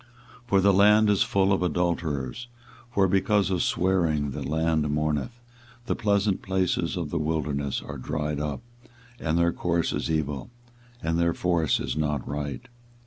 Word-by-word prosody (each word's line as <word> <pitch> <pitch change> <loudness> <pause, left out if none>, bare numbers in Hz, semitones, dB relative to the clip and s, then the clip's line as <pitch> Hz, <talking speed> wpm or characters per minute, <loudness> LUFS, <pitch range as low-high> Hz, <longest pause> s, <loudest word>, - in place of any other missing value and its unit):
24:023:010 - - -29
For 100 -4 +3
the 100 +1 +4
land 105 +2 +5
is 100 - +2
full 100 0 +2
of 95 - 0
adulterers; 85 - -1 0.4
for 100 -5 +2
because 100 +1 +2
of 90 -2 +1
swearing 80 -6 +1
the - - -5
land 80 0 0
mourneth; 75 - -1 0.5
the - - -1
pleasant 100 -2 +1
places 95 -2 0
of 80 -4 -4
the 85 - -1
wilderness 75 -3 -2
are 70 -2 -7
dried 75 +1 -3
up, 75 -2 -4 0.6
and 80 0 0
their 85 0 +2
course 85 -1 0
is - - -2
evil, 75 - -2 0.5
and 80 +1 0
their 85 0 +2
force 85 -6 +1
is - - -3
not 75 -3 -1
right. 75 - -4
85 Hz, 160 wpm, -26 LUFS, 75-95 Hz, 0.6 s, land